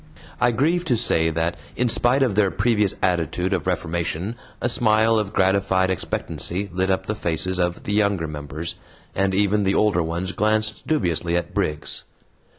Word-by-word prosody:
I - - +4
grieve 155 +9 +1
to 125 -7 +2
say 80 -7 +3
that 80 +1 -1 0.2
in 125 - +1
spite 120 +4 +3
of 125 -6 +1
their 100 -1 +3
previous 105 -1 +1
attitude 90 +1 0
of 95 - -2
reformation 85 +2 -2 0.3
a - - 0
smile 110 -1 +3
of 105 -2 -3
gratified 95 -1 +2
expectancy 95 +1 -3
lit 95 +1 0
up 95 - 0
the 105 - -2
faces 95 -1 -1
of 90 0 -1
the 105 - -3
younger 100 -5 +1
members, 75 +2 -5 0.4
and 95 0 0
even 105 +1 +2
the 95 0 +1
older 105 -5 +3
ones 85 +3 -3
glanced 110 +1 0
dubiously 85 - 0
at 85 - -4
Briggs. 75 -1 -1
95 Hz, 165 wpm, -22 LUFS, 85-110 Hz, 0.4 s, I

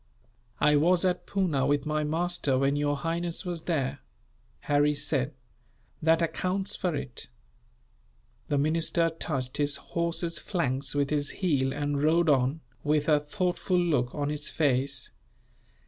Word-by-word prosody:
"I 150 0 +5
was 175 +4 +3
at 180 -1 0
Poona, 175 -9 +1
with 145 -1 +1
my 155 0 0
master, 160 -3 0
when 135 +2 +2
your 145 0 +1
highness 170 +5 -3
was 175 -3 -4
there," 145 -7 -1 0.6
Harry 145 +1 +2
said. 140 -1 -1 0.7
"That 165 +1 +3
accounts 185 +4 -1
for 180 -4 -1
it." 120 -4 -6 1.2
The 145 - 0
minister 165 +3 +2
touched 135 -6 -4
his 145 -1 +2
horse's 170 0 -2
flanks 135 -7 -2
with 140 0 +1
his 145 -1 0
heel 140 -8 0
and 145 0 -1
rode 165 +2 +3
on, 135 +2 +2 0.2
with 150 0 +1
a 150 -2 +5
thoughtful 180 +4 -1
look 145 -9 +1
on 145 -1 -1
his 150 0 -2
face. 135 -3 0
150 Hz, 140 wpm, -28 LUFS, 140-170 Hz, 1.2 s, I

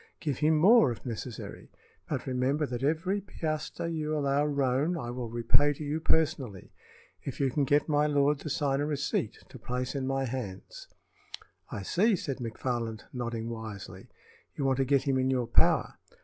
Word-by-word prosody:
Give 145 -5 -2
him 155 +1 +4
more, 190 - +6
if 115 - -8
necessary; 120 0 -6 0.4
but - - -2
remember 130 +4 +1
that 125 -3 -4
every 165 +8 +1
piastre 155 -5 -4
you 155 -2 -1
allow 140 0 +2
Roane 140 +4 +1
I 120 -6 -4
will 120 -1 -4
repay 120 +5 +3
to 150 - -7
you 150 +2 -1
personally, 150 - 0 0.5
if 135 - -6
you 135 -2 +2
can 145 +1 +1
get 145 +2 +3
my 150 -1 +3
lord 145 0 +2
to 155 - -6
sign 140 -1 +1
a 145 - 0
receipt 140 -6 -1
to 130 - -12
place 125 +2 -3
in 135 -2 -2
my 135 0 0
hands." 115 -7 -6 0.8
"I 100 - -5
see," 205 - +3
said 140 -6 -3
McFarland, 115 -2 -3
nodding 120 -2 -3
wisely. 110 -3 -7 0.5
"You 140 - -2
want 135 -1 +2
to 135 - +2
get 135 0 +3
him 135 -2 +1
in 130 0 +2
your 125 -2 +1
power." 115 - +3
135 Hz, 175 wpm, -29 LUFS, 125-150 Hz, 0.8 s, more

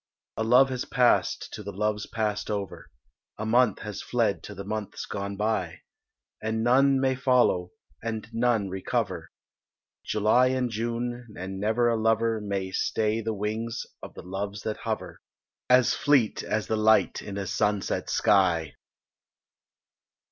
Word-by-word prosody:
A 110 - -1
love 125 +4 +5
has 125 -1 -2
passed 125 -1 +1
to 110 - -6
the 100 0 -6
loves 105 +1 -1
passed 105 -2 -2
over, 100 -2 -4 0.5
A 110 - -4
month 120 -1 +3
has - - -6
fled - - 0
to - - -8
the 100 - -6
months 105 0 -5
gone 100 0 -5
by; 110 +2 -1 0.6
And 110 +1 -1
none 135 +3 +4
may 130 0 +2
follow, 125 -9 +2 0.3
and 110 -2 -4
none 115 -3 +1
recover 95 0 -2 0.7
July 110 +4 +3
and 130 -2 0
June, 120 +2 -3
and 95 +1 -5
never 110 +4 +2
a 115 -2 +1
lover 115 0 +2
May 100 -2 -3
stay 110 +3 0
the 110 0 -2
wings 110 +3 -3 0.2
of - - -10
the - - -9
Loves 100 +2 -5
that 110 - -3
hover, - - -5 0.5
As 125 0 +5
fleet 145 -8 +2
as 110 -1 -2
the 110 - -1
light 110 +1 +3
in 100 -1 -7
a 100 - -3
sunset 105 +1 -1
sky. 85 -6 +2
110 Hz, 150 wpm, -27 LUFS, 100-120 Hz, 0.7 s, love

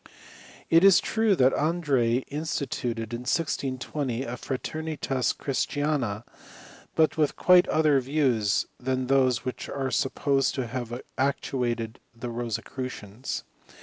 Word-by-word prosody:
It 165 +2 +6
is 195 -2 +8
true 220 -2 +2
that 130 -4 +4
Andreae 140 -7 +1
instituted, 125 -6 -3
in 120 - -2
1620, 130 -2 -2
a/ra^er 130 +5 -4
nitas 130 -2 0
christifina, 135 -5 -1 0.7
but 160 0 +3
with 150 -3 +2
quite 180 -1 +6
other 155 -3 +3
views 125 -6 +1
than 130 0 -1
those 130 -2 +2
which 130 - -4
are 135 -2 -2
supposed 135 0 +1
to 130 - -1
have 120 0 -4 0.2
actuated 120 -4 -1 0.2
the 120 +1 -6
Rosecrucians. 115 0 -5
130 Hz, 115 wpm, -27 LUFS, 120-145 Hz, 0.7 s, is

